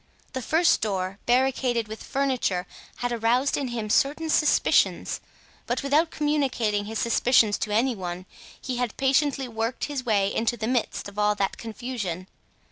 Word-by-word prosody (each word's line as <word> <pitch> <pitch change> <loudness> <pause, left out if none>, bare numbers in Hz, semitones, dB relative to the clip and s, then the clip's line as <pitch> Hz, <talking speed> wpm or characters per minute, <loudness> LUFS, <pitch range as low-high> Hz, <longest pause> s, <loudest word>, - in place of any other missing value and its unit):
The 260 - -3
first 320 +7 +3
door, 195 -2 -2
barricaded 250 -2 +2
with 220 +1 -8
furniture, 255 -10 0 0.3
had 245 0 -3
aroused 240 +4 +2
in 275 - -2
him 235 -3 -3
certain 300 +6 +2
suspicions, 300 -1 +2 0.5
but - - -1
without 300 +4 +3
communicating 260 -10 0
his 220 +1 -5
suspicions 230 -2 +3
to 210 - -2
any 240 +5 +2
one 180 -1 -5 0.3
he 255 -1 -4
had 245 -3 -2
patiently 275 0 +2
worked 225 +1 -3
his 285 -3 -4
way 205 -4 +1
into 230 +2 0
the 220 - -3
midst 245 -4 -1
of 200 +1 -8
all 210 0 +3
that 195 -1 -1
confusion. 220 -6 -5
240 Hz, 155 wpm, -25 LUFS, 210-265 Hz, 0.5 s, first